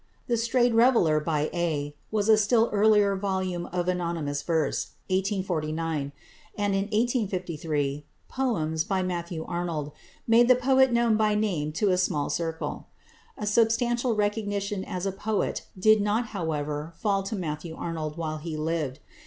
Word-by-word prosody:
"The 240 - +1
Strayed 240 +1 +2
Reveller" 225 -10 +4
by 150 -1 -1
"A" 155 -4 -1
was 210 -1 0
a 220 - +7
still 225 +2 +3
earlier 205 -1 +4
volume 190 -3 -2
of 175 0 -2
anonymous 170 -5 -1
verse 160 -2 -1 0.2
(1849); 165 -6 -1 0.5
and, 205 -1 0
in 195 0 +1
1853, 180 - -1 0.2
"Poems" 160 -12 -1
by 190 0 -1
Matthew 170 -2 -3
Arnold 170 -4 -3 0.4
made 235 +1 +6
the 255 - +7
poet 265 +1 +4
known 235 -2 +3
by 215 -1 +2
name 180 -9 0
to 200 +4 +1
a 180 - +2
small 150 -5 0
circle. 165 -1 -3 0.5
A 210 - -4
substantial 235 +2 +2
recognition 205 -2 -1
as 180 +1 -4
a 195 - 0
poet 210 +2 -2
did 215 +3 +5
not 215 +3 0
however 150 -3 -3
fall 200 -2 +1
to 195 +3 -4
Matthew 160 -2 -4
Arnold 160 -2 -4
while 155 -2 -3
he 155 0 -5
lived. 155 -4 -2
185 Hz, 145 wpm, -27 LUFS, 160-215 Hz, 0.5 s, a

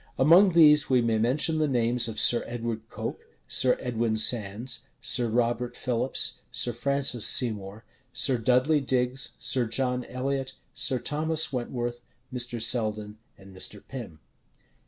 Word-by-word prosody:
Among 175 +7 +6
these 150 -3 +6
we 130 -1 +4
may 115 -2 +1
mention 145 +7 +1
the 155 - +2
names 120 -2 +1
of 110 - -5
Sir 120 - +4
Edward 115 -2 -5
Coke, - - -6 0.3
Sir 125 - +2
Edwin 115 -3 -1
Sandys, 110 +1 +1 0.2
Sir 120 -2 +1
Robert 120 +1 -1
Philips, 125 +1 -1
Sir 120 - -1
Francis 130 -1 -1
Seymour, 105 -3 +1 0.3
Sir 125 0 +1
Dudley 130 +6 +2
Digges, 130 0 -1
Sir 125 -3 0
John 125 +2 -1
Elliot, 130 +1 -3 0.2
Sir 130 - -1
Thomas 155 +4 -1
Wentworth, 120 -1 -4 0.3
Mr. 120 -1 0
Selden, 110 -2 0 0.2
and 95 0 -15
Mr. 100 +2 -3
Pym. 120 -12 -8
125 Hz, 135 wpm, -26 LUFS, 115-130 Hz, 0.3 s, Among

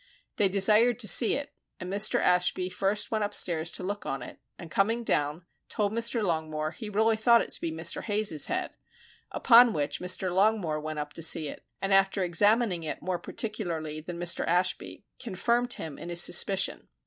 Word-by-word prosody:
They 200 -2 +2
desired 215 +5 +3
to 235 -3 -1
see 230 +2 +5
it 285 - -6 0.3
and 180 - -7
Mr. 205 +1 +4
Ashby 180 0 +1
first 195 +3 0
went 215 -1 -1
upstairs 170 -5 +1
to - - -5
look 205 +2 -5
on 135 -2 -5
it, - - -11 0.2
and 165 -2 -11
coming 225 +6 0
down, 150 -3 -1 0.2
told 205 -1 0
Mr. 230 0 +1
Longmore 155 -3 -3
he 220 -3 -8
really 220 +2 +1
thought 235 +2 +3
it - - -10
to - - -1
be 165 - -3
Mr. 160 +1 -1
Hayes's 205 -8 0
head, 365 0 -3 0.6
upon 240 -1 +5
which 145 -1 -2
Mr. 180 0 0
Longmore 190 -6 +1
went 155 0 -6
up 150 0 -6
to - - -7
see 160 -2 +2
it, - - -11 0.2
and 195 0 0
after 195 0 +2
examining 205 +2 +2
it 155 - -6
more 180 -1 -3
particularly 165 -8 -5
than 170 +2 -8
Mr. 175 0 0
Ashby, 180 +4 -1
confirmed 240 +2 -1
him 155 -4 -8
in 170 - -8
his 175 0 +1
suspicion. 195 +2 +1
190 Hz, 185 wpm, -27 LUFS, 165-215 Hz, 0.6 s, see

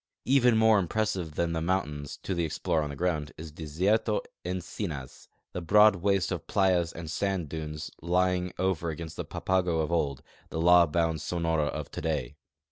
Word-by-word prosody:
Even 125 -3 +4
more 110 -1 +5
impressive 95 -4 -1
than 85 -1 0
the 80 - -1
mountains, 75 -5 -2
to 95 - -2
the 85 -1 0
explorer 80 0 0
on 75 - -3
the 70 - -6
ground, 75 -2 -1
is 80 0 -8
Desierto 90 +8 0 0.2
Encinas 85 - -5
— - - -51
the 90 - -3
broad 105 +4 +6
waste 95 0 +1
of - - -4
playas 90 -4 +2
and 80 -1 -7
sand 95 -6 -1
dunes 75 -1 -5
lying 90 +1 +1
over 90 -2 0
against 80 +1 -6
the - - -3
Papago 90 -3 0
of 80 - -2
old, 70 -6 0 0.3
the 80 - -4
law 85 0 +6
bound 80 0 0
Sonora 80 -2 0
of - - -5
today. 75 -4 -3
85 Hz, 175 wpm, -28 LUFS, 80-95 Hz, 0.3 s, broad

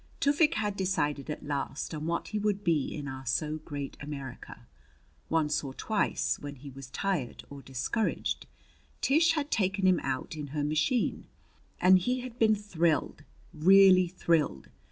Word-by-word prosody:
Tufik 300 +3 +3
had 210 -2 -1
decided 150 -7 -1
at 150 - -5
last 145 +1 -3
on 155 0 -4
what 170 0 -2
he 215 - -2
would 205 -1 0
be 160 -6 +2
in 145 -2 -5
our 130 -1 -6
so 150 +4 -1
great 145 -3 -6
America. 140 - -8 0.6
Once 155 -2 +1
or 135 -2 -7
twice, 215 -2 0
when 145 0 -7
he 140 +1 -10
was 135 0 -10
tired 175 -7 -2
or 140 -1 -8
discouraged, 135 - -2 0.5
Tish 320 +4 +4
had 300 -2 -2
taken 195 -2 +1
him 185 -2 +5
out 130 +3 -3
in 150 -2 -5
her 145 - +1
machine, 155 - 0 0.5
and 185 +1 +6
he 250 +7 -1
had 250 -1 -9
been 220 -1 +5
thrilled 170 -8 0 0.3
really 185 +2 +6
thrilled. 165 - 0
165 Hz, 155 wpm, -29 LUFS, 145-205 Hz, 0.6 s, and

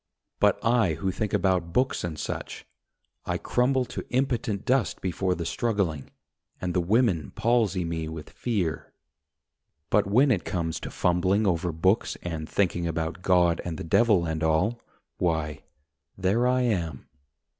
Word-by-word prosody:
But - - +4
I 115 -8 +3
who 95 +3 -2
think 105 +2 -3
about 90 -3 +1
books 130 +1 +1
and 85 -3 -4
such - - -5 0.6
I - - 0
crumble 130 +1 +1
to - - -6
impotent 125 -5 -1
dust 130 -4 +1
before 95 0 -1
the 85 - -4
struggling, 100 - -1 0.5
And 90 -1 -2
the 90 - +2
women 95 - +2
palsy 110 -5 +1
me 80 -1 -3
with 80 -1 -8
fear. 95 -10 -2 1.0
But 105 -1 +3
when 130 +7 +4
it 95 -8 +1
comes 85 -4 -2
to - - -6
fumbling 95 +4 +1
over 90 -2 +1
books 95 +7 +1
And 80 -3 -4
thinking 85 -3 0
about 80 +2 -3
God 90 -2 +3
and 85 -2 -4
the - - -5
Devil 100 +1 +3
and 80 0 -2
all, 90 +9 +1 0.4
Why, 80 -4 -1 0.6
there 100 +6 +2
I 125 0 +2
am. 85 - -1
90 Hz, 150 wpm, -26 LUFS, 85-110 Hz, 1.0 s, But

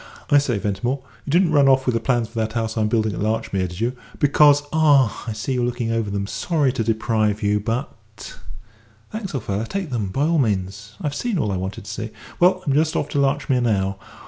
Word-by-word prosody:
"I 145 - +7
say, 130 -6 -1
Ventimore, 105 +7 -2 0.2
you - - -7
didn't 175 +1 +3
run 145 -3 +5
off 130 0 +4
with 125 - +1
the 115 - +1
plans 120 -3 +1
for 115 +1 -6
that 110 -1 -1
house 110 -1 -2
I'm 110 -2 +1
building 110 -1 +1
at - - -5
Larchmere, 100 -3 -1
did 90 +1 -9
you? 120 +3 -1 0.2
Because 145 0 +5
ah, 145 -7 +3
I 110 - -2
see 110 +5 -3
you're 125 -1 0
looking 120 -1 -1
over 115 -2 -1
them. 100 0 -2
Sorry 145 - 0
to 120 - -1
deprive 110 -1 0
you, 105 0 +2
but 110 -1 -6 0.3
" 110 0 -31
"Thanks, 215 -7 -5
old 130 - -3
fellow, 100 +1 -2
take 190 +4 -4
them, 110 -5 -1
by 135 +10 -1
all 165 0 +2
means. 105 -1 -2
I've 145 -2 -1
seen 235 +4 -2
all 105 -10 0
I 95 - -1
wanted 95 +1 -5
to 105 - -6
see." 110 0 -5 0.3
"Well, 185 +1 +4
I'm 140 - +1
just 155 +2 +2
off 145 - -1
to 145 - -1
Larchmere 135 -2 +1
now. 100 -4 0
115 Hz, 230 wpm, -22 LUFS, 105-140 Hz, 0.3 s, I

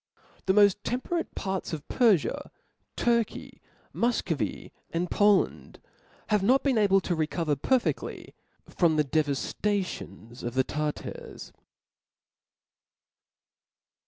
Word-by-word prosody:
The 190 - +4
moft 205 -1 +5
temperate 295 +8 -2
parts 190 -3 -3
of 150 -2 -6
Perfia, 220 - +2 0.5
Turky, 235 -2 0 0.3
Mufcovy, 165 - -1 0.2
and 170 +1 -2
Poland, 205 -2 +2 0.5
have 210 -2 +3
not 255 +7 +3
been 265 -5 +2
able 195 -2 +4
to 180 - -1
i - - -3
ecover 160 -3 -1
pcrfediy 250 - -1 0.3
from 170 -3 +2
the 150 -1 +2
devaftations 145 - -2
of 120 +1 -5
the 130 - +3
Tartars. 150 +2 -5
190 Hz, 100 wpm, -28 LUFS, 150-215 Hz, 0.5 s, moft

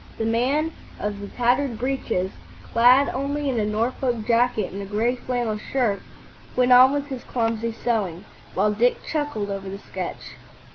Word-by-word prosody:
The 225 - -1
man 265 +8 +1 0.3
of 205 -1 -3
the 200 - -6
tattered 245 +2 +1
breeches, 235 -7 -1 0.4
clad 250 +4 +6
only 280 +2 -2
in 240 - -1
a 210 - +1
Norfolk 230 +1 -1
jacket 235 -3 +2
and 200 - -5
a - - -5
gray 220 +5 0
flannel 240 -3 -2
shirt, 230 -5 0 0.5
went 250 0 +3
on 255 +1 +9
with 285 0 -2
his 260 -3 -5
clumsy 230 -1 -1
sewing, 210 -6 -2 0.3
while 210 - +3
Dick 240 +4 +3
chuckled 290 -10 -2
over 195 -1 -5
the 195 - -5
sketch. 185 - -6
235 Hz, 160 wpm, -24 LUFS, 210-255 Hz, 0.5 s, on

